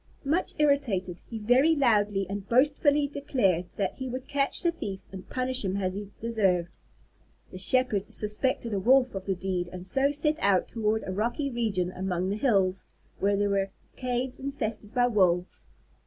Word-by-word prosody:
Much 325 +7 0
irritated, 240 - +1
he 230 - -5
very 250 +9 +4
loudly 210 -7 +2
and 200 0 -6
boastfully 290 +3 +3
declared 200 - 0
that 195 -2 -1
he 260 -1 -4
would 255 +1 -6
catch 280 -1 0
the 340 - +3
thief 195 - -5
and 190 -1 -10
punish 255 0 -1
him 190 0 -1
as 185 -2 -1
he 200 0 -6
deserved. 195 -7 +1 0.8
The 185 - -8
Shepherd 220 -1 +2
suspected 225 +2 -1
a 200 - 0
Wolf 255 +5 +4
of 195 0 -6
the 190 - +1
deed 180 -1 -2
and 180 0 -7
so 270 +8 +2
set 300 +1 0
out 195 -2 +2
toward 220 -1 -1
a - - -4
rocky 240 +8 -1
region 205 -7 -1
among 185 0 -2
the 205 - -1
hills, 195 -7 +1 0.3
where 200 0 +2
there 205 0 +1
were 195 0 +1 0.3
caves 250 0 -3
infested 225 -6 -4
by 245 -1 +4
Wolves. 185 -6 +1
215 Hz, 170 wpm, -28 LUFS, 190-260 Hz, 0.8 s, very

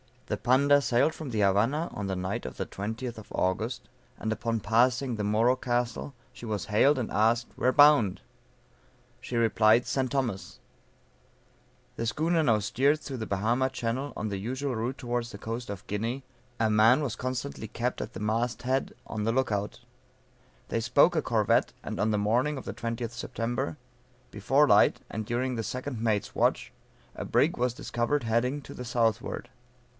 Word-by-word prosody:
The - - -2
Panda 140 +4 +4
sailed 130 +4 +2
from 155 -4 -7
the 110 -3 -1
Havana 115 - +2
on 100 -1 -4
the 95 - -2
night 90 -5 -3
of 65 - -6
the - - -3
20th 110 +4 -5
of 110 - -12
August; 110 +7 -1 0.3
and 110 - -3
upon 115 0 -1
passing 120 +5 +2
the 105 - -2
Moro 115 +5 +3
Castle, 120 +2 -2 0.2
she 125 -1 -10
was 105 -6 -3
hailed, 140 +7 +5
and 120 -4 -3
asked, 115 +3 +2
"where 130 - +2
bound?" 145 -10 +5 1.0
She 125 - -6
replied, 115 0 +4
St. 130 -2 -1
Thomas. 115 -10 -3 1.4
The 115 - -2
schooner 165 +7 +1
now 115 -7 +3
steered 140 +9 +1
through 135 -3 -6
the 110 -2 -5
Bahama 115 +7 +1
channel, 130 +2 -3
on 110 - -3
the 100 - -3
usual 130 +7 -3
route 120 +5 -2
towards 120 -1 -3
the - - -8
coast 115 +2 -5
of 100 -2 -6
Guinea; 115 +6 -3 0.4
a 110 -1 +2
man 110 +7 +5
was 125 -5 -3
constantly 130 -2 -4
kept 120 +3 -3
at - - -6
the - - -7
mast 115 +3 -1
head, 130 +2 -1
on 105 -1 -4
the 115 - +1
lookout; 110 -4 -1 0.9
they - - 0
spoke 135 +9 +4
a 155 - +2
corvette, 110 -6 +2
and - - -5
on 110 - +2
the 105 - +1
morning 120 +8 +1
of 130 - -6
the - - -4
20th 115 0 -4
Sept., 115 -7 -3 0.6
before - - +3
light, - - +5
and 110 +1 -4
during 125 +3 -1
the 115 - -2
second 125 +2 -4
mate's 110 -3 0
watch, - - +1 0.4
a - - -5
brig - - +2
was 125 0 +1
discovered 120 +3 -1
heading 120 +5 0
to - - -11
the 125 - -7
southward. 115 0 -1
120 Hz, 175 wpm, -28 LUFS, 110-130 Hz, 1.4 s, hailed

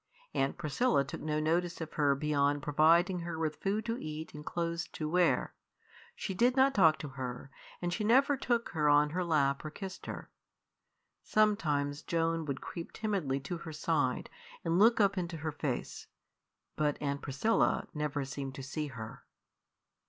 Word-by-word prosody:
Aunt 135 0 0
Priscilla 170 - +2
took 135 - -7
no 155 0 -1
notice 170 +3 0
of 160 -2 -6
her 145 -2 +3
beyond 145 0 +1
providing 165 +5 +4
her 170 -1 -4
with 160 -1 -2
food 205 +3 -1
to 230 +1 -2
eat 155 +1 -6
and 150 0 -8
clothes 170 +1 -2
to 155 - -3
wear. 180 +2 +2 0.6
She 200 - -4
did 245 +6 +3
not 270 +1 +5
talk 165 -8 +5
to 150 - -6
her, 130 0 -6 0.3
and 175 0 0
she 215 - -2
never 270 +6 +4
took 240 -3 0
her 150 -4 +1
on 145 0 +5
her 180 +3 -1
lap 140 -5 +1
or 155 - -4
kissed 190 +4 -8
her. - - -7 0.9
Sometimes 150 -9 +1
Joan 165 -1 0
would 140 -2 -4
creep 170 - -7
timidly 190 -11 -1
to 170 +6 -4
her 165 - -7
side 150 -4 0 0.3
and 165 +2 +2
look 225 +3 +6
up 200 -2 +3
into 170 -1 -4
her 155 +1 -3
face, 145 -4 -4 0.7
but 150 -1 0
Aunt 140 -1 -2
Priscilla 145 +12 +1
never 150 -2 -2
seemed 135 0 -5
to 135 - -7
see 150 +3 -3
her. 115 -4 -8
155 Hz, 170 wpm, -32 LUFS, 145-180 Hz, 0.9 s, look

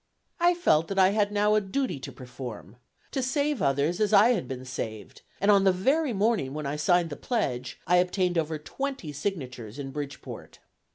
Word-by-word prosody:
I 350 +1 +4
felt 165 - +3
that 195 - -4
I 190 -1 +6
had 205 0 +1
now 210 +1 +2
a 215 - +4
duty 200 - -2
to 130 - -7
perform, 120 - -9 0.3
to 270 - -1
save 285 +1 0
others, 145 +5 +1
as 215 0 +1
I 210 +3 +7
had 205 - 0
been 130 0 -6
saved, 110 -5 -6 0.2
and 200 +1 +4
on 200 -1 +5
the 195 - +5
very 270 - +1
morning 205 - 0
when 155 -1 -4
I 140 +1 -2
signed 170 +2 +2
the - - -4
pledge, 130 - -2
I 180 - +4
obtained 180 0 +1
over 160 0 -2
twenty 265 - -5
signatures 130 - -5
in 135 -2 -5
Bridgeport. 145 0 -7
180 Hz, 190 wpm, -27 LUFS, 135-210 Hz, 0.3 s, I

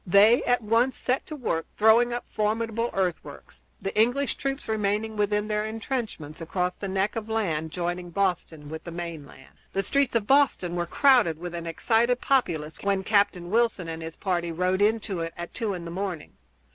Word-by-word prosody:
They 205 +6 +6
at 245 -1 +2
once 230 +4 +2
set 255 +2 -1
to 310 - -6
work 165 - -2
throwing 225 +3 +5
up 240 0 -3
formidable 225 +2 -1
earthworks, 180 - -4 0.2
the 195 - -4
English 245 +6 +2
troops 275 0 -4
remaining 215 0 -1
within 210 0 0
their 210 0 0
intrenchments 220 - -4
across 180 +2 -1
the 200 - -6
neck 195 +2 0
of 225 -1 -4
land 165 -8 -1
joining 175 +1 -3
Boston 170 -5 -1
with 160 +1 -7
the - - -7
mainland. 165 -6 -8
The 195 - 0
streets 275 +5 +1
of 225 -3 +2
Boston 265 -10 +3
were 175 -1 -1
crowded 245 - +4
with 175 +1 -6
an 170 -1 -5
excited 235 +8 +2
populace 160 - 0
when 200 -1 0
Captain 190 -3 +1
Wilson 225 -6 +1
and 165 0 -5
his 160 0 -6
party 175 -3 -1
rode 185 +3 0
into 210 -3 +1
it 165 0 -3
at 175 0 -7
two 220 -4 -2
in 175 -1 -7
the 170 - -6
morning. 180 -3 -4
200 Hz, 185 wpm, -26 LUFS, 175-225 Hz, 0.2 s, They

